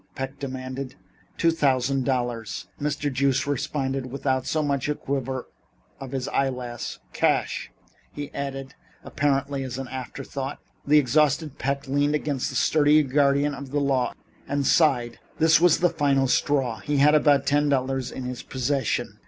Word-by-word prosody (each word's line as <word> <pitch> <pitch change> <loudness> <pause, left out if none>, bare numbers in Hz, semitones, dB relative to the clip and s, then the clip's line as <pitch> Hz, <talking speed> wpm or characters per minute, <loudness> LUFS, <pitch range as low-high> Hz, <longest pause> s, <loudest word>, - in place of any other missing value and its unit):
Peck 135 +1 -5
demanded. 130 -1 -5 0.4
"Two 165 - +3
thousand 135 -4 +1
dollars," 120 -4 -2 0.2
Mr. 145 -1 -1
Joost 135 -1 +1
replied 135 -1 -2
without 130 0 -1
so 155 -1 0
much 140 -1 -1
as 150 - +1
the - - -20
quiver 130 -2 -3 0.5
of 135 0 -6
an 130 - -2
eyelash. 125 -3 -2 0.2
"Cash," - - 0 0.4
he 145 -1 -6
added, 135 -1 -5 0.3
apparently 140 -1 0
as 130 -2 -5
an 135 -1 -5
afterthought. 135 +2 -5 0.3
The 150 +1 +6
exhausted 150 +2 +2
Peck 140 +2 -2
leaned 145 +2 +1
against 145 -3 -1
the 130 - -7
sturdy 150 +3 +4
guardian 140 +1 +2
of 140 -1 -7
the 145 +2 0
law 135 -3 0 0.3
and 140 0 -1
sighed. 130 -8 +3 0.2
This 160 0 +5
was 175 -2 +5
the 175 - +5
final 140 -4 +2
straw. 130 -3 +1
He 145 0 -1
had 145 +2 +5
about 145 -2 +4
ten 145 0 +2
dollars 135 -1 0
in 130 - -6
his 125 0 -5
possession. 130 -1 -2
135 Hz, 155 wpm, -25 LUFS, 130-145 Hz, 0.5 s, The